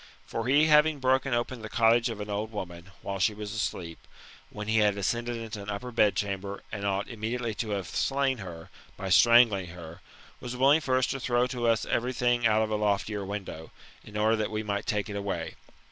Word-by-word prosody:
For 115 +1 -4
he 145 +4 +5
having 150 0 +5
broken 130 0 +1
open 120 +1 -2
the 110 - -8
little 110 - -6
cottage 115 +1 +4
of 110 -2 -6
an 105 0 -6
old 105 +2 -3
woman, 90 -4 -7
while 100 0 -4
she 100 +3 +2
was 105 -1 -6
asleep^ 90 -6 -3 0.5
when 105 0 -7
he 110 0 +3
had 105 -1 +3
ascended 120 +5 -1
into 115 -2 -6
an 100 - -8
upper 125 +5 -4
bed 105 -4 +3
cham 100 -1 -2
ber, 100 0 -7
and 100 -2 -3
ought 100 0 -1
immediately 115 +1 -3
to 110 - -5
have 95 - -4
slain 135 +2 0
her, 85 -4 -9 0.3
by 95 -2 -4
strangling 115 -2 +6
her, 85 0 -10 0.4
was 125 0 -6
willing 140 +5 +5
first 130 -3 +1
to 135 - -3
throw 120 0 +1
to 125 -1 -2
us 115 -1 +2
every 125 +2 -1
thing 120 -1 +2
out 110 0 +3
of 110 - -3
a 105 - +1
loftier 105 0 0
win 100 +1 -4
dow, 80 -3 -9 0.3
in 105 - -8
order 110 +1 +3
that 110 -1 -1
we 110 0 -3
might 100 -1 -3
take 105 -3 -1
it 105 - -6
away. 95 -5 -3
110 Hz, 220 wpm, -28 LUFS, 100-120 Hz, 0.5 s, strangling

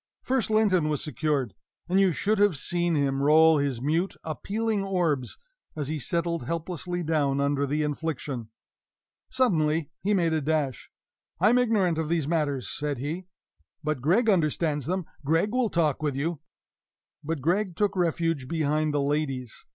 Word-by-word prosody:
First 255 -4 0
Linton 200 -7 +3
was 150 -2 -1
secured; 145 - -1 0.3
and 185 +2 +2
you 195 -2 +4
should 200 +8 0
have 205 -7 +3
seen 175 +3 0
him 135 -2 +1
roll 155 +2 +6
his 135 -4 -1
mute, 165 +6 0
appealing 205 +6 -2
orbs, 170 -10 -1 0.4
as 150 -3 -3
he 155 0 -2
settled 170 -2 -1
helplessly 175 +2 -3
down 145 -4 +1
under 140 0 +1
the 150 +2 0
infliction. 145 -6 -3 0.8
Suddenly 160 - +1
he 205 +2 +1
made 170 -3 +2
a 160 - +1
dash. 145 -5 -1 0.5
"I 195 +5 +5
am 250 - +4
ignorant 200 -9 +2
of 160 -1 -2
these 165 -4 0
matters," 150 -6 0
said 145 -2 -3
he; 160 +8 -4 0.6
"but 155 -4 -1
Gregg 190 - +3
understands 155 - +1
them 185 0 -1 0.2
Gregg 165 +8 +1
will 250 -2 +1
talk 160 -5 +1
with 145 -3 -1
you." 155 +3 -2 0.8
But 160 +1 -2
Gregg 180 +4 0
took 205 0 0
refuge 165 -5 0
behind 155 0 0
the 145 - +1
ladies. 140 -4 -2
160 Hz, 160 wpm, -27 LUFS, 145-180 Hz, 0.8 s, roll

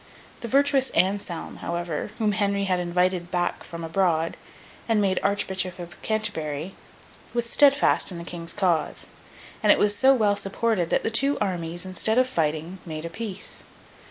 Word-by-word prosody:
The 235 - -5
virtuous 275 +1 +3
Anselm, 190 -2 0
however, 170 0 -3
whom 215 -2 +1
Henry 200 -1 +1
had 185 -2 +1
invited 180 0 0
back 175 -1 -1
from 170 0 -8
abroad, 165 -1 +1 0.5
and 225 -2 +3
made 190 -2 +2
Archbishop 190 -2 -1
of 175 -1 -10
Canterbury, 185 -7 -2 0.6
was 240 -1 +1
steadfast 280 -3 +4
in 175 - -6
the 170 - -6
King's 170 -1 -5
cause; 180 -6 0 0.6
and 210 -2 +5
it - - +6
was 205 0 +3
so 270 +4 +5
well 210 -4 +3
supported 195 -2 -1
that - - +1
the 225 - 0
two 275 +5 +2
armies, 175 -3 -2
instead 185 +5 0
of 255 0 +4
fighting, 160 -2 -2
made 155 -1 -6
a 170 - -5
peace. 210 0 -5
190 Hz, 160 wpm, -25 LUFS, 170-215 Hz, 0.6 s, it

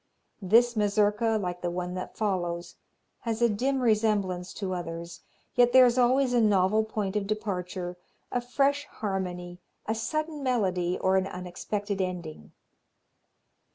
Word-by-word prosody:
This 235 +5 +4
Mazurka, 210 +1 +2
like 180 -2 -4
the 175 - -1
one 180 +1 -3
that 185 0 -6
follows, 175 -5 -2 0.5
has 230 -2 -3
a 235 - +5
dim 260 +5 0
resemblance 210 -6 +1
to 190 -2 -3
others, 170 -1 -6 0.3
yet 245 -1 +4
there 260 -1 +9
is 240 -1 +3
always 250 +1 +3
a 240 - +4
novel 210 0 +3
point 215 -2 -3
of 205 -1 -1
departure, 185 -4 -3 0.3
a 245 - 0
fresh 280 +3 +1
harmony, 180 -3 -4 0.3
a 220 - 0
sudden 305 +6 -3
melody 185 -9 0
or 190 0 +2
an 190 0 +1
unexpected 195 +2 -4
ending. 170 - -5
205 Hz, 140 wpm, -28 LUFS, 180-230 Hz, 0.5 s, there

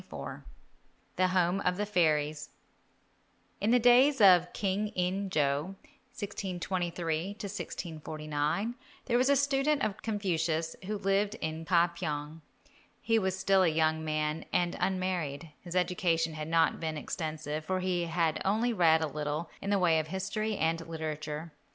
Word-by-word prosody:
XXIV - - -7 0.7
THE 185 - +3
HOME 180 0 +2
OF 180 -1 0
THE 210 - 0
FAIRIES 155 -5 +1 1.1
In 205 - +1
the 245 - +6
days 245 +4 +5
of 180 -4 +6
King 200 +1 -1
In 185 +2 -1
jo 150 +3 0 0.4
(1623 175 -5 -3
1649) 160 -1 -3 0.3
there 240 -1 +2
was 260 +2 +3
a 280 - +5
student 280 +1 +2
of 210 -1 -2
Confucius 165 -6 -1
who 210 0 -2
lived 200 +2 +1
in 160 -3 -4
Ka 170 0 +3
pyong. 155 -2 -4 0.6
He 225 -1 +2
was 190 -2 -1
still 195 0 +3
a 185 - +4
young 160 0 +1
man 155 0 -1
and 175 -1 +1
unmarried. 175 -5 -2
His 175 0 -8
education 170 -3 +1
had 155 0 -5
not 165 0 +2
been 160 -2 -3
extensive, 155 0 -4
for 185 +3 -1
he 180 -2 0
had 165 -1 0
read - - -8
only 220 +5 +1
a 160 -6 +4
little 150 +2 -3
in 200 - -4
the 205 - +3
way 170 -4 +3
of 155 - -3
history 215 +4 -2
and 165 +1 0
literature. 155 0 -5
175 Hz, 150 wpm, -30 LUFS, 160-195 Hz, 1.1 s, the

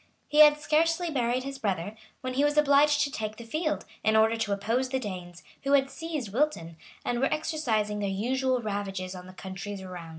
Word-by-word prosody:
He 300 - +1
had 300 -1 +9
scarcely 325 +3 +1
buried 250 -2 0
his 275 0 -6
brother, 200 -2 -2 0.3
when 255 0 -3
he 275 +3 +2
was 290 +1 +2
obliged 295 0 +5
to 290 -1 0
take 215 -3 -4
the 235 - -9
field, 310 +7 -2 0.2
in 220 0 +3
order 220 +1 +4
to 225 -2 -2
oppose 230 +6 0
the 265 - 0
Danes, 180 -7 -7 0.2
who 275 +1 0
had 270 -1 +4
seized 295 -8 -5
Wilton, 230 - 0 0.3
and 240 0 0
were 270 - +1
exercising 230 -10 -1
their 200 -1 -1
usual 250 +5 0
ravages 195 -3 -3
on 180 -1 -9
the 185 - -11
countries 190 +2 -7
around. 180 -3 -8
240 Hz, 200 wpm, -28 LUFS, 200-290 Hz, 0.3 s, had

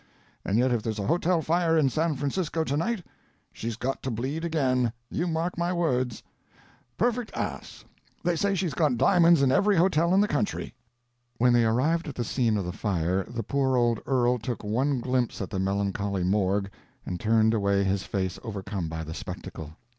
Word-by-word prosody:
And 100 - 0
yet 125 +2 +3
if 120 -2 +1
there's 110 0 -3
a 100 - -2
hotel 170 - +1
fire 165 0 +2
in 150 -3 +4
San 160 +1 0
Francisco 155 +4 -1
to 140 - -1
night 215 +5 -1 0.5
she's 115 0 -4
got 130 +3 -3
to 130 - -3
bleed 130 +8 -3
again, 130 -7 +1 0.2
you 175 - -1
mark 170 +1 -2
my 170 +1 0
words. 130 -9 0 0.7
Perfect 240 -1 0
ass; - - -5 0.4
they 175 0 +1
say 200 +4 +1
she's 180 -5 -1
got 140 -3 +1
diamonds 170 -1 +5
in 130 - +4
every 200 +8 +3
hotel 170 -1 +3
in - - +5
the 205 - +3
country." 210 - -2 0.6
When 125 +1 +4
they 120 -1 +4
arrived 150 +10 +1
at 145 - -6
the 120 - -2
scene 115 -2 +1
of 100 - -2
the 90 - -3
fire 90 -1 -1
the 115 -1 -4
poor 130 +2 +1
old 120 -2 +2
earl 125 -2 +2
took 115 +1 -4
one 125 +5 0
glimpse 125 -1 -1
at 95 - -5
the 95 - -2
melancholy 100 0 -1
morgue 100 +1 +1 0.3
and 90 -1 -4
turned 110 0 +3
away 100 -2 +2
his 95 0 0
face 95 -1 -3
overcome 100 -5 -4
by 80 0 -4
the 80 0 -6
spectacle. 80 -1 -8
125 Hz, 190 wpm, -27 LUFS, 105-165 Hz, 0.7 s, diamonds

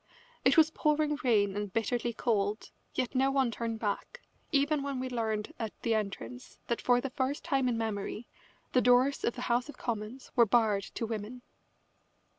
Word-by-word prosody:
It 260 +4 +4
was 320 0 +6
pouring 300 -1 +1
rain 205 -5 +3
and 205 -1 -3
bitterly 235 +2 0
cold, 215 -2 -1 0.2
yet 250 - -1
no 265 +1 +3
one 270 -3 +2
turned 230 0 -3
back, 220 - -3 0.3
even 290 0 +2
when 275 -2 -3
we 255 0 -3
learned 220 -3 -2
at 220 -2 -5
the 230 - +2
entrance 195 - -4
that 235 - -2
for 245 -1 +4
the 265 +1 -4
first 265 +3 -1
time 270 -6 +1
in 235 - 0
memory 220 0 -3 0.5
the 255 - +5
doors 250 +3 +4
of 235 - 0
the 250 - -6
House 245 +3 +1
of - - -9
Commons 230 +2 -5
were 235 -2 +6
barred 210 -3 +3
to 230 - -1
women. 225 +2 -5
240 Hz, 180 wpm, -31 LUFS, 215-265 Hz, 0.5 s, was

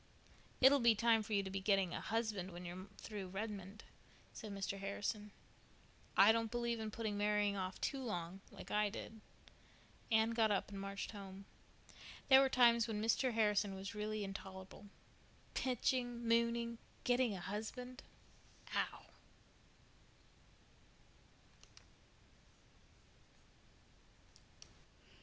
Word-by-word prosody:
"It'll 275 +2 +8
be 235 -2 +5
time 225 +1 +4
for 215 +1 -5
you 200 -1 +3
to 190 - -5
be 195 - -2
getting 195 -2 +2
a - - -3
husband 215 -5 -1
when 175 0 -8
you're 180 +2 -7
through 205 -4 -6
Redmond," 200 +1 -6 0.5
said 215 -3 -7
Mr. 195 0 -3
Harrison. 205 +1 -3 0.9
"I 200 +3 +9
don't 225 0 +1
believe 235 -1 -1
in 220 -1 -3
putting 215 -1 -3
marrying 205 -1 +2
off 185 -1 -3
too 275 -2 -1
long—like 190 -4 -6
I 210 0 +2
did." 220 +1 -8 0.9
Anne 220 +1 +4
got 225 -1 +3
up 200 -2 0
and 195 -1 -5
marched 195 0 -4
home. 195 -2 -9 0.8
There 265 0 +9
were 270 - +4
times 235 -2 +5
when 215 -2 -2
Mr. 230 +4 +2
Harrison 210 -2 +2
was 195 +2 -6
really 210 0 -2
intolerable. 190 0 -8 0.7
"Pitching," 245 -1 0
"mooning," 235 0 +3
and 235 - -8 0.3
"getting 245 -3 +2
a - - -5
husband." 225 +7 -5 0.7
Ow!! - - -1
210 Hz, 120 wpm, -38 LUFS, 195-230 Hz, 0.9 s, I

